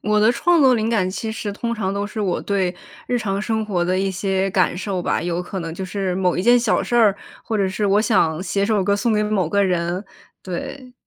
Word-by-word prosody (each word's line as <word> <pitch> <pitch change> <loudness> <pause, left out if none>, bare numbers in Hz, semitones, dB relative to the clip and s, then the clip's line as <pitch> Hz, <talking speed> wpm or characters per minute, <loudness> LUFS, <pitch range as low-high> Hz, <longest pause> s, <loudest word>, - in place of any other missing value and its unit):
我 210 0 +1
的 215 +2 +5
创 345 +5 +3
作 265 -3 +6
灵 220 -1 0
感 210 -6 +1
其 220 +3 -4
实 215 -2 -4
通 235 +3 -3
常 195 -4 -2
都 200 +1 -2
是， 215 +1 -6
我 190 -3 0
对 190 -3 -1 0.3
日 245 - 0
常 200 -3 -2
生 220 0 -1
活 180 -5 -1
的 185 +1 0
一 195 0 0
些 195 0 -1
感 180 -1 +1
受 190 -1 -3
吧， - - 0
有 175 +1 -2
可 190 +1 -5
能 165 -1 -5
就 190 +2 -5
是 185 -1 -2
某 180 -1 +1
一 180 - 0
件 240 +2 +5
小 235 -2 +1
事 - - -3
儿， 215 -4 +5 0.3
或 220 - -2
者 195 -2 +1
是 190 +3 -2
我 200 +1 +3
想 185 -7 +2
写 200 0 0
首 210 -2 +1
歌 200 +1 +1
送 225 +3 0
给 210 0 +2
某 205 -6 0
个 200 +2 +2
人， 180 +1 -1 0.4
对。 250 +8 -6
200 Hz, 265 characters per minute, -21 LUFS, 185-220 Hz, 0.4 s, 作